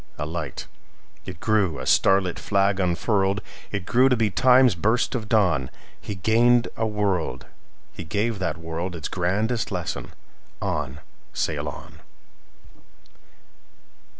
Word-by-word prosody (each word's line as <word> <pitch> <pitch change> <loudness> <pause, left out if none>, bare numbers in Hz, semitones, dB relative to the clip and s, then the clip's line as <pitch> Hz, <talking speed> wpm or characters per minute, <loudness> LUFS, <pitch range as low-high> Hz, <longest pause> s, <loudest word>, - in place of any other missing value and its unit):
A 75 - -3
light! 80 +1 -5 0.6
It 90 -3 -7
grew, 100 -8 +1
a 65 - -6
starlit 95 +4 +3
flag 100 -1 +1
unfurled! 95 +2 +1 0.3
It 100 -3 -3
grew 130 +6 +4
to 125 - +3
be 110 -3 +1
Time's 125 +1 +5
burst 110 +8 +1
of 110 -4 -4
dawn. 90 - +2 0.3
He 105 - -5
gained 115 +6 +3
a 110 - -1
world; 95 - -1 0.5
he - - -7
gave 105 +6 -1
that 85 -4 -2
worldIts 80 0 -4
grandest 105 +6 -1
lesson: - - -4 0.5
"On! 75 -1 -3 0.3
sail 75 -2 -1
on!" 80 +1 -11
95 Hz, 125 wpm, -24 LUFS, 80-110 Hz, 0.6 s, Time's